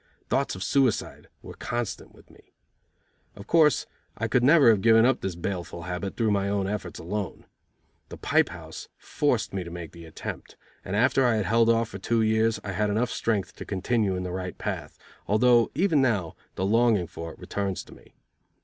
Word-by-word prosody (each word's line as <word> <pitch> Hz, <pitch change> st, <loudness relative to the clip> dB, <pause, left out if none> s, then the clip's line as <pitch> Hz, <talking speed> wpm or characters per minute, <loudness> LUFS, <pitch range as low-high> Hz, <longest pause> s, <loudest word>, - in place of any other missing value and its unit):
Thoughts -, -, 0 dB
of 95 Hz, -, -5 dB
suicide 135 Hz, -6 st, 0 dB, 0.2 s
were -, -, -9 dB
constant 120 Hz, -3 st, -4 dB
with -, -, -20 dB
me. -, -, -22 dB, 0.8 s
Of 100 Hz, -, -11 dB
course, 155 Hz, 0 st, +4 dB, 0.3 s
I -, -, -1 dB
could 125 Hz, -, +2 dB
never 140 Hz, -1 st, +7 dB
have 105 Hz, -3 st, +1 dB
given 115 Hz, +1 st, +6 dB
up 130 Hz, 0 st, +2 dB
this 95 Hz, -3 st, -3 dB
baleful 85 Hz, -1 st, -5 dB
habit 90 Hz, +2 st, -5 dB
through 110 Hz, -2 st, +2 dB
my 100 Hz, -1 st, +1 dB
own 100 Hz, -1 st, 0 dB
efforts 95 Hz, -3 st, -4 dB
alone. 100 Hz, +3 st, -5 dB, 0.6 s
The -, -, -9 dB
pipe -, -, +2 dB
house -, -, -9 dB
forced 125 Hz, -10 st, -1 dB
me 95 Hz, -2 st, -2 dB
to 85 Hz, -, -8 dB
make 85 Hz, -1 st, -7 dB
the 85 Hz, -1 st, -12 dB
attempt, 80 Hz, -, -8 dB, 0.3 s
and 95 Hz, -, -4 dB
after 130 Hz, +4 st, +3 dB
I 120 Hz, -2 st, +3 dB
had 105 Hz, -3 st, 0 dB
held 115 Hz, +1 st, +3 dB
off 115 Hz, -1 st, +2 dB
for 95 Hz, -, -8 dB
two 115 Hz, +4 st, +1 dB
years, 110 Hz, 0 st, +2 dB
I 100 Hz, -, -4 dB
had 105 Hz, +2 st, 0 dB
enough 110 Hz, +4 st, 0 dB
strength 105 Hz, -4 st, -1 dB
to -, -, -6 dB
continue 100 Hz, 0 st, 0 dB
in 90 Hz, -, -3 dB
the 90 Hz, -, -4 dB
right 90 Hz, 0 st, -5 dB
path, -, -, -5 dB, 0.3 s
although 120 Hz, +2 st, +4 dB
even 170 Hz, -6 st, +3 dB
now 105 Hz, -10 st, 0 dB, 0.2 s
the 95 Hz, -, -1 dB
longing 110 Hz, -2 st, +3 dB
for 85 Hz, 0 st, -8 dB
it -, -, -18 dB
returns 100 Hz, -2 st, -3 dB
to -, -, -15 dB
me. -, -, -19 dB
105 Hz, 195 wpm, -26 LUFS, 95-120 Hz, 0.8 s, never